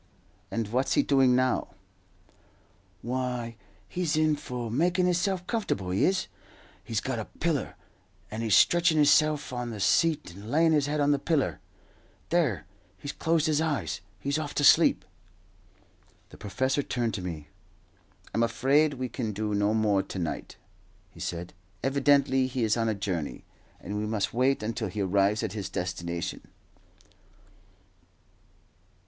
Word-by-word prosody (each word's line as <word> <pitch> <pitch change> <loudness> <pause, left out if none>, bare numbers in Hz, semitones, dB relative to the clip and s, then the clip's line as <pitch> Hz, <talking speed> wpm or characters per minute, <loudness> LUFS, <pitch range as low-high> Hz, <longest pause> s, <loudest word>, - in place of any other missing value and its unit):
"And 115 -2 -2
what's 130 +4 0
he - - +4
doing 135 -3 +4
now?" 130 0 0 1.3
"Why, 125 -1 -3 0.3
he's 170 -3 -1
in 155 -1 +3
for 125 -5 -5
makin' 175 +8 +2
hisself 180 +1 0
comfortable, 140 - -2
he 95 - +2
is. 190 +1 +1 0.6
He's 110 -3 -2
got 130 -3 -3
a 110 - -4
piller, 160 -4 -2 0.6
and 110 +1 -4
he's 110 -4 +3
stretchin' 170 -2 +4
hisself 150 -1 +3
on 120 -1 -3
the 110 -3 -6
seat 155 - +2
and 100 +4 -10
layin' 160 +4 +3
his 145 -2 +2
head 150 +1 -1
on 145 0 +3
the 145 - +2
piller. 140 - 0 0.7
There, 150 - +1 0.3
he's 145 - -5
closed 160 -1 +1
his 155 -1 +2
eyes 145 - -2 0.2
he's 140 +2 -1
off 145 -2 -5
to 145 - 0
sleep." - - +5 1.2
The - - -14
professor 130 +7 -1
turned 120 -4 -2
to 100 - -3
me. 80 -5 -6 0.8
"I - - -2
am - - +2
afraid 135 +6 +2
we 130 0 -3
can 115 -3 -4
do 105 +1 -2
no 105 +1 +2
more 105 -3 +2
to 95 0 -8
night," 85 -3 -4 0.5
he - - -16
said. 85 0 -5 0.3
"Evidently 135 -1 +3
he 130 -1 -2
is 110 -1 +2
on 115 -1 0
a 110 - 0
journey, 95 -7 -4 0.3
and 105 +3 -4
we 105 - -2
must 105 -2 -1
wait 130 +1 +2
until 110 0 -2
he 100 +3 -4
arrives 100 +2 +2
at - - -3
his 100 -3 -4
destination." 85 -2 -4
125 Hz, 155 wpm, -28 LUFS, 105-145 Hz, 1.3 s, sleep